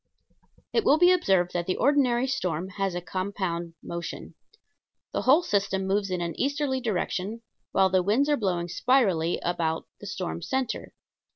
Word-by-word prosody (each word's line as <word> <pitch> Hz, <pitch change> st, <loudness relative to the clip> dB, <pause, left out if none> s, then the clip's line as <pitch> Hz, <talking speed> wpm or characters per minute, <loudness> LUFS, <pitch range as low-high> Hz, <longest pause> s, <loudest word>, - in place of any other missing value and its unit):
It 455 Hz, -, +2 dB
will 290 Hz, -, +5 dB
be 355 Hz, +2 st, +6 dB
observed 190 Hz, -, +2 dB
that 175 Hz, -1 st, -2 dB
the 185 Hz, -, +1 dB
ordinary 255 Hz, -3 st, +3 dB
storm 185 Hz, -10 st, -2 dB
has 195 Hz, -2 st, -2 dB
a 175 Hz, -, -2 dB
compound 185 Hz, -3 st, -3 dB
motion. 170 Hz, 0 st, -6 dB, 0.8 s
The -, -, 0 dB
whole 295 Hz, +7 st, +5 dB
system 195 Hz, -, 0 dB
moves 195 Hz, +1 st, 0 dB
in 180 Hz, -1 st, -2 dB
an 170 Hz, -1 st, -2 dB
easterly 280 Hz, -1 st, 0 dB
direction, 215 Hz, 0 st, -2 dB, 0.3 s
while 190 Hz, -1 st, +3 dB
the 185 Hz, -1 st, +4 dB
winds 220 Hz, +10 st, +2 dB
are 295 Hz, -, +3 dB
blowing 180 Hz, -8 st, -1 dB
spirally 180 Hz, -5 st, +2 dB
about 165 Hz, -2 st, -1 dB
the 205 Hz, -, -9 dB
storm 180 Hz, -3 st, -4 dB
center. 265 Hz, +4 st, -3 dB
195 Hz, 160 wpm, -27 LUFS, 175-260 Hz, 0.8 s, be